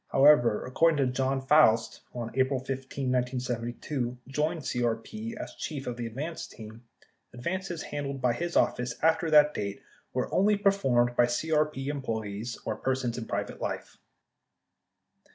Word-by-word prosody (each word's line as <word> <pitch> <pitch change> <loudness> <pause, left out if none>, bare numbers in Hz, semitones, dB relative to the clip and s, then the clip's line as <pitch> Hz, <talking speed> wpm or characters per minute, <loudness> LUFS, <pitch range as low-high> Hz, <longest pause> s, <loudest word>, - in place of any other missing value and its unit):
However, 135 -6 +5
according 155 +5 +3
to 130 -3 +1
Jon 135 +1 0
Foust 135 -6 +4
who, 120 - -5
on 115 -1 -5
April 130 0 +2
15, 135 0 -3
1972, 125 0 -2
joined 155 +4 -1
CRP 125 - -2
as - - -6
chief 145 -4 -5
of 125 - -3
the 120 -1 -4
advance 150 +9 -5
team, 110 +1 -11 0.5
advances 175 +6 -3
handled 140 -2 -4
by 125 -2 +2
his 170 +6 -3
office 125 -1 +1
after 160 +1 +3
that 150 -1 +6
date 100 -1 -4 0.3
were - - -2
only 205 +2 +4
performed 135 - +2
by 120 - +5
CRP 150 +1 0
employees 115 -5 -3
or 110 - -2
persons 130 -2 -1
in 115 - -5
private - - -3
life. - - -4
130 Hz, 145 wpm, -29 LUFS, 120-150 Hz, 0.5 s, that